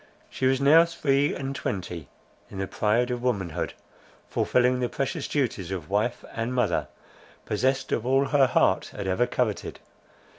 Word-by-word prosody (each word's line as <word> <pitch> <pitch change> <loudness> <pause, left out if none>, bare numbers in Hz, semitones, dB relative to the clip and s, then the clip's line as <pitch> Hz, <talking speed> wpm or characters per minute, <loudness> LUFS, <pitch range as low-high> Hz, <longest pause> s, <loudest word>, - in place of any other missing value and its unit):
She 130 - 0
was 130 0 +2
now 150 +4 +7
three 145 -4 +1
and 135 0 -4
twenty, 90 - -4 0.4
in 100 - -9
the 95 - -1
pride 110 +5 +1
of 120 -1 -3
womanhood, 100 -10 -2 0.5
fulfilling 125 0 +2
the 125 -1 0
precious 135 -1 -3
duties 115 - -1
of 95 -2 -5
wife 110 +4 0
and 115 +2 -2
mother, 125 - +1 0.6
possessed 130 +5 0
of 110 - 0
all 135 +2 +3
her 140 -3 +4
heart - - +2
had 100 - -5
ever 95 +6 +1
coveted. 110 -5 -2
125 Hz, 155 wpm, -26 LUFS, 100-135 Hz, 0.6 s, now